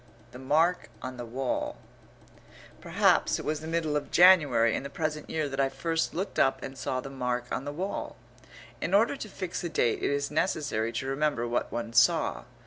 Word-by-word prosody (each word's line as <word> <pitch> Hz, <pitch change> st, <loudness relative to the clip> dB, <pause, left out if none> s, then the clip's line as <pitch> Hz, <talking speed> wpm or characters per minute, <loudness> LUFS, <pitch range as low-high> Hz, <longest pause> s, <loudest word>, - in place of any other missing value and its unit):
THE 125 Hz, -, -10 dB
MARK 160 Hz, +7 st, +1 dB
ON 130 Hz, 0 st, -6 dB
THE 120 Hz, -1 st, -6 dB
WALL 130 Hz, +2 st, -2 dB, 1.0 s
Perhaps -, -, +2 dB
it -, -, -7 dB
was 155 Hz, 0 st, -1 dB
the 160 Hz, -, -8 dB
middle 160 Hz, -2 st, -1 dB
of 150 Hz, -, -2 dB
January 145 Hz, -, +6 dB
in -, -, -2 dB
the 140 Hz, -, -7 dB
present 155 Hz, 0 st, -3 dB
year 155 Hz, -2 st, -1 dB
that 135 Hz, 0 st, -5 dB
I 135 Hz, 0 st, +3 dB
first 165 Hz, +4 st, -2 dB
looked 190 Hz, +4 st, -3 dB
up 135 Hz, -, +2 dB
and 135 Hz, -, -6 dB
saw 130 Hz, -1 st, -3 dB
the 135 Hz, -, -8 dB
mark 125 Hz, -2 st, -2 dB
on 130 Hz, -, -3 dB
the 145 Hz, -, -3 dB
wall. 185 Hz, +7 st, -4 dB, 0.7 s
In 190 Hz, -, +1 dB
order 225 Hz, +6 st, +3 dB
to 230 Hz, -6 st, -7 dB
fix 185 Hz, -3 st, -5 dB
a 170 Hz, -, -2 dB
date 120 Hz, -7 st, +1 dB
it -, -, +1 dB
is 140 Hz, 0 st, -1 dB
necessary 145 Hz, -, 0 dB
to 130 Hz, -, -4 dB
remember 135 Hz, -3 st, 0 dB
what 120 Hz, +1 st, -1 dB
one 115 Hz, -1 st, -4 dB
saw. 160 Hz, +5 st, +3 dB
145 Hz, 200 wpm, -28 LUFS, 130-165 Hz, 1.0 s, January